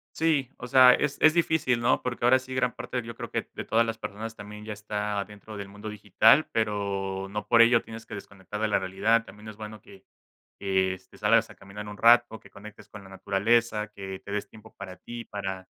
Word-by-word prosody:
Sí, 155 -5 +1
o 120 - -7
sea, 130 0 +7
es 140 - 0
es 155 0 +6
difícil, 160 -8 +1
¿no? 120 - +2
Porque 120 -1 -4
ahora 125 +2 +6
sí, 130 0 -10
gran 125 -1 0
parte, 125 - -4
yo 115 0 -8
creo, - - -7
que - - -3
de - - -5
todas 115 +1 +2
las 115 0 -3
personas, 110 +1 -6
también 105 0 -10
ya 110 - -5
está 105 -1 -3
dentro 105 +1 -12
del 100 -1 -7
mundo 105 +2 -9
digital, 105 - +4
pero 100 -3 -2
no 105 0 -4
por 115 +2 +6
ello 115 0 +5
tienes 115 0 -10
que - - -8
desconectar 100 0 -8
de 110 - +2
la 105 - +1
realidad. 100 +5 +1
También 105 +1 -13
es 110 - -9
bueno 110 0 -9
que 95 -1 -17 0.6
que, 95 -1 +1
este, 95 0 -14
salgas - - +3
a - - -13
caminar 105 +2 -10
un 105 0 -8
rato, 120 -1 +5
que - - -18
conectes 105 +1 -13
con 105 - -11
la 95 - -14
naturaleza, 105 +3 +1
que 95 -2 -8
te 100 - -9
des 105 0 -3
tiempo 110 +1 -16
para 95 -1 -8
ti, 120 +4 -9
para, 95 -2 -5
105 Hz, 225 wpm, -27 LUFS, 100-115 Hz, 0.6 s, sea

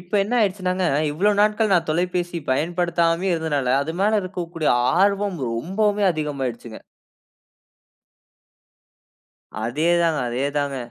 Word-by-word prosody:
இப்போ 180 +3 -10
என்ன 235 +5 -3
ஆயிடுச்சுனாங்க, 185 -2 0 0.3
இவ்வளோ 195 +7 +2
நாட்கள் 210 0 +2
நான் 175 - +1
தொலைபேசி 175 +1 -1
பயன்படுத்தாமே 170 +4 0
இருந்ததனால, 150 -6 -1
அது 160 +3 -5
மேல 210 +1 +2
இருக்கக்கூடிய 175 -4 -3 0.3
ஆர்வம் 200 -1 +1
ரொம்பவுமே 200 - 0
அதிகம் 150 -3 -4
ஆயிடுச்சுங்க. 120 -2 -6 2.8
அதே 145 +9 -1
தாங்க 165 -2 +1
அதே 125 +3 -2
தாங்க. 140 -1 -2
175 Hz, 110 wpm, -22 LUFS, 150-195 Hz, 2.8 s, இவ்வளோ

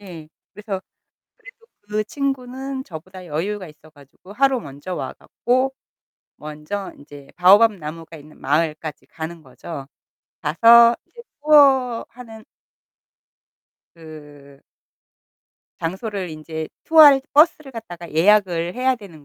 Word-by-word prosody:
예. 170 -6 -11 0.2
그래서 205 -2 -6 0.6
그래도 - - -17 0.2
그 210 +1 -3
친구는 265 +1 -4
저보다 185 0 -11
여유가 180 +4 -4
있어 155 +1 -18
가지고 145 +6 -17
하루 270 +2 +2
먼저 145 +1 -8
와 - - -5
갖고 255 +2 -1 0.6
먼저 155 +6 -7
인제 145 -1 -14
바오밥나무가 180 -4 +3
있는 150 0 -16
마을까지 155 +1 -2
가는 160 0 -8
거죠. 135 +1 -9 0.6
가서 230 +9 +6
이제 475 - -15 0.2
투어하는 250 -6 +2 1.5
그 145 -3 -14 1.2
장소를 190 +2 -4
인제 155 0 -7 0.2
투어할 300 -4 +7
버스를 305 -2 +3
갖다가 175 -7 -9
예약을 175 0 +2
해야 255 +1 +1
되는 175 -9 -14
185 Hz, 245 characters per minute, -21 LUFS, 155-240 Hz, 1.5 s, 투어할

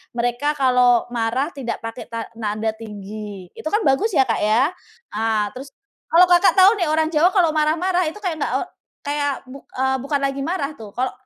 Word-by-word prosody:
mereka 245 +4 0
kalau 250 -3 +3
marah 240 +3 -1
tidak 250 -4 -4
pakai 225 +2 -7
ta 230 -1 -4
nada 220 0 -2
tinggi, 210 -3 -8
itu - - -7
kan 420 - +2
bagus 275 +12 +2
ya, 270 - +6
Kak, - - 0
ya. 220 +6 +3 0.5
Nah, 215 -1 0
terus 270 +2 -9 0.4
kalau 340 +2 +7
Kakak 355 +2 +5
tahu 380 +2 +8
nih 350 - +1
orang 315 0 +2
Jawa 335 +3 +4
kalau 345 -5 +4
marah-marah 340 +4 +1
itu 320 +7 -6
kayak 355 -4 -1
nggak - - -1
e - - -3 0.5
kayak 285 0 0
buk 270 +2 -11
eee, 265 +1 0
bukan 280 +1 -1
lagi 275 0 -2
marah 305 -2 -2
tuh. 215 -2 -11
Kalau 255 +4 -2
265 Hz, 190 wpm, -21 LUFS, 225-310 Hz, 0.5 s, tahu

